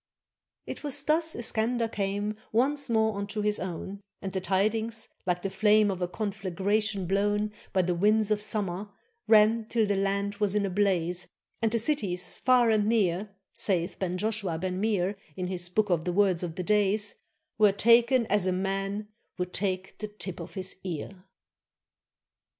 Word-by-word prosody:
It -, -, -7 dB
was 285 Hz, -1 st, +1 dB
thus 315 Hz, +2 st, +2 dB
Iskander 230 Hz, 0 st, 0 dB
came 205 Hz, 0 st, -2 dB, 0.2 s
Once 275 Hz, +5 st, +1 dB
more 220 Hz, -2 st, +2 dB
unto 200 Hz, +1 st, -3 dB
his 210 Hz, 0 st, 0 dB
own; 190 Hz, +2 st, -5 dB, 0.2 s
And 190 Hz, -1 st, -6 dB
the 190 Hz, -, -1 dB
tidings, 220 Hz, +4 st, 0 dB, 0.2 s
like 180 Hz, 0 st, 0 dB
the 195 Hz, -, -1 dB
flame 210 Hz, +1 st, +4 dB
Of 185 Hz, -1 st, -5 dB
a 180 Hz, -, +1 dB
conflagration 200 Hz, 0 st, -1 dB
blown 205 Hz, +3 st, +1 dB, 0.2 s
By 185 Hz, -1 st, +2 dB
the 180 Hz, 0 st, 0 dB
winds 210 Hz, +4 st, +2 dB
of 210 Hz, -1 st, +2 dB
summer, 205 Hz, -2 st, -2 dB, 0.4 s
ran, 220 Hz, +1 st, +5 dB
Till 225 Hz, 0 st, +1 dB
the 205 Hz, -1 st, 0 dB
land 200 Hz, +1 st, -1 dB
was 205 Hz, -1 st, +1 dB
in 205 Hz, -1 st, +2 dB
a 195 Hz, -, -2 dB
blaze, 180 Hz, -2 st, 0 dB, 0.3 s
And 225 Hz, -1 st, +2 dB
the 230 Hz, -, +2 dB
cities 215 Hz, -8 st, -1 dB
far 250 Hz, -3 st, +4 dB
and 210 Hz, -1 st, +2 dB
near, 205 Hz, -3 st, +1 dB, 0.2 s
Sayeth 180 Hz, -2 st, -1 dB
Ben 180 Hz, -1 st, -1 dB
Joshua 205 Hz, -4 st, -1 dB
Ben 185 Hz, +2 st, -3 dB
Meir 205 Hz, -2 st, 0 dB, 0.2 s
In 185 Hz, -, -2 dB
his 180 Hz, -1 st, -2 dB
Book 205 Hz, +2 st, +1 dB
of 165 Hz, -2 st, +2 dB
the 180 Hz, -, -2 dB
Words 190 Hz, -3 st, +3 dB
of 170 Hz, -3 st, -4 dB
the 180 Hz, -, -3 dB
Days, 210 Hz, +1 st, +2 dB, 0.5 s
"Were 210 Hz, -2 st, +6 dB
taken 235 Hz, +4 st, +4 dB
as 205 Hz, -3 st, +1 dB
a -, -, +2 dB
man 195 Hz, +2 st, -2 dB, 0.3 s
Would 180 Hz, 0 st, -3 dB
take 190 Hz, -1 st, -2 dB
the 215 Hz, -, -3 dB
tip 205 Hz, -3 st, -6 dB
of -, -, -9 dB
his 190 Hz, -1 st, -3 dB
ear." 185 Hz, +2 st, -6 dB
205 Hz, 175 wpm, -28 LUFS, 185-215 Hz, 0.5 s, Were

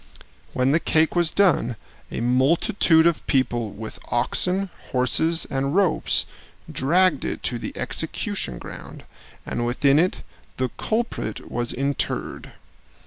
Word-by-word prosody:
When 130 Hz, +1 st, +2 dB
the 160 Hz, -, +4 dB
cake 160 Hz, 0 st, +2 dB
was 175 Hz, -2 st, +3 dB
done, 165 Hz, -, +2 dB, 0.3 s
a -, -, -4 dB
multitude 160 Hz, -, +3 dB
of 170 Hz, -2 st, +2 dB
people 120 Hz, -4 st, +1 dB
with 110 Hz, +2 st, -8 dB
oxen, 180 Hz, +10 st, 0 dB, 0.2 s
horses, 160 Hz, +6 st, +1 dB
and 135 Hz, +3 st, -1 dB
ropes 195 Hz, -3 st, +2 dB, 0.5 s
dragged 170 Hz, +2 st, +2 dB
it -, -, -4 dB
to 120 Hz, -, -1 dB
the -, -, -6 dB
execution 65 Hz, -2 st, -2 dB
ground, -, -, -10 dB, 0.4 s
and 120 Hz, -, -3 dB
within 135 Hz, +4 st, +3 dB
it 180 Hz, +3 st, 0 dB, 0.3 s
the 130 Hz, 0 st, 0 dB
culprit 230 Hz, -, -3 dB
was 120 Hz, 0 st, -1 dB
interred. 140 Hz, +2 st, -3 dB
140 Hz, 125 wpm, -23 LUFS, 125-170 Hz, 0.5 s, the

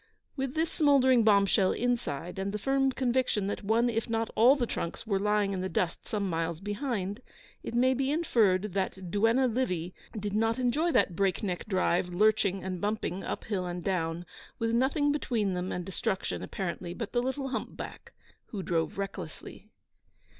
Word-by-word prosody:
With 270 Hz, 0 st, -3 dB
this 320 Hz, +1 st, 0 dB
smouldering 260 Hz, -5 st, +4 dB
bomb 200 Hz, -2 st, +5 dB
shell 195 Hz, -1 st, +3 dB
inside, 195 Hz, -, -2 dB
and 195 Hz, +1 st, -2 dB
the 210 Hz, -, -2 dB
firm 270 Hz, +4 st, +2 dB
conviction 250 Hz, -5 st, +1 dB
that 200 Hz, -, -3 dB
one 225 Hz, +4 st, +3 dB
if 230 Hz, 0 st, -1 dB
not 225 Hz, -1 st, -1 dB
all 245 Hz, +5 st, +7 dB
the 255 Hz, -4 st, 0 dB
trunks 170 Hz, -4 st, -4 dB
were 200 Hz, -3 st, +1 dB
lying 210 Hz, 0 st, +1 dB
in 185 Hz, -, -2 dB
the 190 Hz, -, -2 dB
dust 175 Hz, -2 st, -2 dB
some 205 Hz, -2 st, -1 dB
miles 165 Hz, -1 st, -2 dB
behind, 205 Hz, 0 st, -3 dB, 0.4 s
it -, -, -6 dB
may 255 Hz, +2 st, +4 dB
be 265 Hz, +1 st, 0 dB
inferred 210 Hz, -, +2 dB
that 190 Hz, -2 st, -3 dB
duenna 225 Hz, +6 st, +3 dB
Livy 185 Hz, -9 st, -1 dB, 0.3 s
did 205 Hz, 0 st, -3 dB
not 225 Hz, +2 st, +2 dB
enjoy 275 Hz, +7 st, +1 dB
that 180 Hz, -, +2 dB
break 195 Hz, +1 st, +1 dB
neck 180 Hz, -1 st, -3 dB
drive, 185 Hz, -2 st, +1 dB
lurching 195 Hz, 0 st, +2 dB
and 185 Hz, -1 st, -4 dB
bumping 205 Hz, -3 st, -2 dB
up -, -, -4 dB
hill 190 Hz, -4 st, -2 dB
and 175 Hz, 0 st, -4 dB
down, 170 Hz, -2 st, -1 dB, 0.3 s
with 225 Hz, 0 st, 0 dB
nothing 275 Hz, +5 st, +2 dB
between 230 Hz, -9 st, 0 dB
them 180 Hz, +1 st, -2 dB
and 180 Hz, -, -3 dB
destruction 190 Hz, +1 st, -2 dB
apparently 175 Hz, -1 st, -4 dB
but 230 Hz, -3 st, -5 dB
the 240 Hz, -, +1 dB
little 270 Hz, +2 st, -2 dB
humpback, -, -, -6 dB, 0.4 s
who 200 Hz, -4 st, -5 dB
drove 165 Hz, 0 st, -1 dB
recklessly. 195 Hz, -1 st, -7 dB
210 Hz, 175 wpm, -29 LUFS, 185-245 Hz, 0.4 s, all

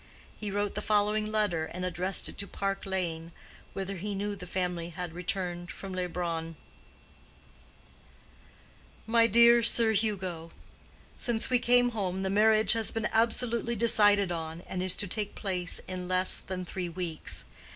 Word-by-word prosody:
He 210 Hz, -, -5 dB
wrote 205 Hz, 0 st, -1 dB
the -, -, -3 dB
following 210 Hz, 0 st, +1 dB
letter, 205 Hz, -7 st, 0 dB
and 180 Hz, +3 st, -5 dB
addressed 180 Hz, +2 st, +2 dB
it -, -, -5 dB
to 200 Hz, -, -2 dB
Park 195 Hz, 0 st, -3 dB
Lane, 170 Hz, -3 st, -3 dB, 0.4 s
whither 195 Hz, 0 st, -4 dB
he 200 Hz, +3 st, -4 dB
knew 205 Hz, +1 st, -3 dB
the 180 Hz, -2 st, -10 dB
family 175 Hz, -1 st, -3 dB
had 175 Hz, -1 st, -6 dB
returned 175 Hz, 0 st, -4 dB
from 195 Hz, 0 st, -8 dB
Leubronn: 170 Hz, -2 st, -3 dB, 2.5 s
MY 230 Hz, 0 st, +4 dB
DEAR 235 Hz, +2 st, +6 dB
SIR 230 Hz, -1 st, +4 dB
HUGO—Since 200 Hz, +3 st, -4 dB
we 250 Hz, -, +4 dB
came 245 Hz, 0 st, +4 dB
home 190 Hz, -4 st, -2 dB
the 190 Hz, -, -1 dB
marriage 215 Hz, +2 st, +5 dB
has 225 Hz, -1 st, 0 dB
been 225 Hz, -1 st, -2 dB
absolutely 235 Hz, +1 st, +1 dB
decided 205 Hz, -4 st, +4 dB
on, 165 Hz, 0 st, -5 dB
and 180 Hz, -, -5 dB
is 185 Hz, -1 st, +4 dB
to 205 Hz, -, -2 dB
take 205 Hz, +2 st, -2 dB
place 180 Hz, -3 st, -2 dB
in 185 Hz, -1 st, -5 dB
less 185 Hz, 0 st, +1 dB
than 185 Hz, -1 st, -6 dB
three 180 Hz, 0 st, -4 dB
weeks. 170 Hz, -2 st, -4 dB
195 Hz, 150 wpm, -29 LUFS, 180-215 Hz, 2.5 s, DEAR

